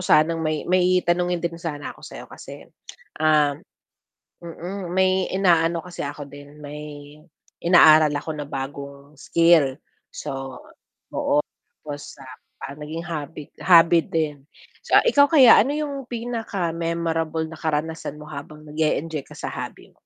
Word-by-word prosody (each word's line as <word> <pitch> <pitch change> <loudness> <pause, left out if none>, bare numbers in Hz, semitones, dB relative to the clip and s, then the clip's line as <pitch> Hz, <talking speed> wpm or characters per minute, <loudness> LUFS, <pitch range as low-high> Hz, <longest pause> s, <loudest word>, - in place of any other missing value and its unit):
sanang 165 +1 +3
may 155 -1 -1
may 185 0 +3
tanungin 175 0 +1
din 170 -1 -3
sana 150 -4 -5
ako - - -20
sayo - - -9
kasi, - - -11 0.5
um 150 -2 +3 0.8
mm, 175 +2 -7
may 190 0 +2
inaano 170 -3 +2
kasi 180 -1 -7
ako 145 0 -7
din, 145 +1 -13
may 145 0 -9 0.5
inaaral 155 -3 +7
ako 145 +2 -4
na 145 -1 -6
bagong 140 +1 -7
skill. 160 -4 +3 0.3
So 135 -1 -6
oo, - - -18 1.1
tapos, 145 -1 -8
ah, 130 +1 -11
naging 155 +3 -6
hobby 155 -2 -6
hobby 170 -1 +6
din. 150 -4 -3 0.4
So - - +6
ikaw 285 -13 +5
kaya 265 -8 +8
ano 275 +6 +1
yung 285 -4 -4
pinaka-memorable 170 -9 -2
na 160 - -10
karanasan 160 -1 -3
mo - - -9
habang 150 +1 -9
nag-e-enjoy 155 0 -1
ka - - -13
sa - - -5
hobby? - - -8
160 Hz, 130 wpm, -23 LUFS, 145-175 Hz, 1.1 s, kaya